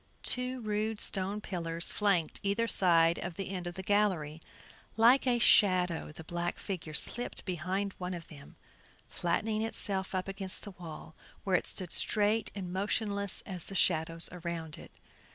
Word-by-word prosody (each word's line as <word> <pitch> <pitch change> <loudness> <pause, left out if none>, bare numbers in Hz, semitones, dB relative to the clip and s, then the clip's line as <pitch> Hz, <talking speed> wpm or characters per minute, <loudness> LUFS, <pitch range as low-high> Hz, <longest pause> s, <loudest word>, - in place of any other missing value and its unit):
Two 250 0 +1
rude 215 0 -1
stone 195 +2 +1
pillars 170 -3 -3
flanked 195 -6 +2
either 205 +4 0
side 170 -5 +4
of 175 -2 -5
the 195 -1 -4
end 180 -2 -4
of 175 - -5
the 190 - -6
gallery. 180 -7 +1 0.6
Like 245 +4 +6
a 245 -1 +4
shadow 180 -8 +4
the 160 - -10
black 175 +2 -3
figure 165 -6 -5
slipped 240 +9 0
behind 185 +2 -2
one 180 0 -3
of 170 -1 -9
these, 140 -3 -12 0.6
flattening 215 +5 -1
itself 195 -4 -2
up 185 0 -2
against 195 -1 -5
the 205 - -7
wall, 165 -3 -10 0.3
where 190 -2 +1
it - - +1
stood 185 -3 0
straight 210 +1 +2
and 180 -3 -5
motionless 200 0 0
as 180 -4 -6
the 195 - -7
shadows 165 -2 +1
around 170 -3 -5
it. - - -12
185 Hz, 160 wpm, -31 LUFS, 170-205 Hz, 0.6 s, Like